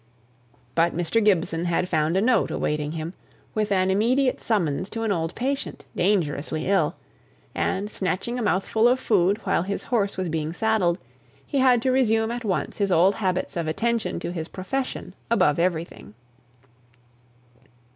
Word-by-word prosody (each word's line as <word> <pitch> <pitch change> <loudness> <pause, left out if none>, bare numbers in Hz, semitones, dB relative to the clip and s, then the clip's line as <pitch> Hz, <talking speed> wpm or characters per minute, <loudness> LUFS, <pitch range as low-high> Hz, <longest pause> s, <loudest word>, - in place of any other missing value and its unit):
But 165 +1 +2
Mr. 175 +6 +1
Gibson 175 -4 +2
had 175 +1 0
found 160 +1 +1
a - - +3
note 235 -2 +3
awaiting 150 0 -2
him, 165 +2 -5 0.4
with 215 -1 -1
an 190 -1 +2
immediate 250 +6 +2
summons 185 -6 0
to 225 0 -4
an 220 - 0
old 165 -3 -1
patient, 270 +3 -3
dangerously 160 -5 0
ill; 195 +1 +2 0.6
and, 200 +2 -1
snatching 195 +6 -2
a - - -2
mouthful 215 +2 +2
of 250 +1 +3
food 200 -4 +2
while - - +1
his 200 +3 -3
horse 205 -6 0
was 185 -1 -1
being 160 0 -2
saddled, 200 -4 +1 0.5
he 280 - -1
had 250 -3 +4
to 260 - +2
resume 225 -3 +2
at 240 0 -4
once 195 -4 -2
his 200 -1 +1
old 180 +3 +5
habits 185 -3 -2
of 170 -2 -2
attention 230 +7 -1
to - - -3
his 165 -2 -4
profession 255 +10 -4 0.2
above 170 -10 +3
everything. 170 - -2
195 Hz, 155 wpm, -24 LUFS, 170-225 Hz, 0.6 s, old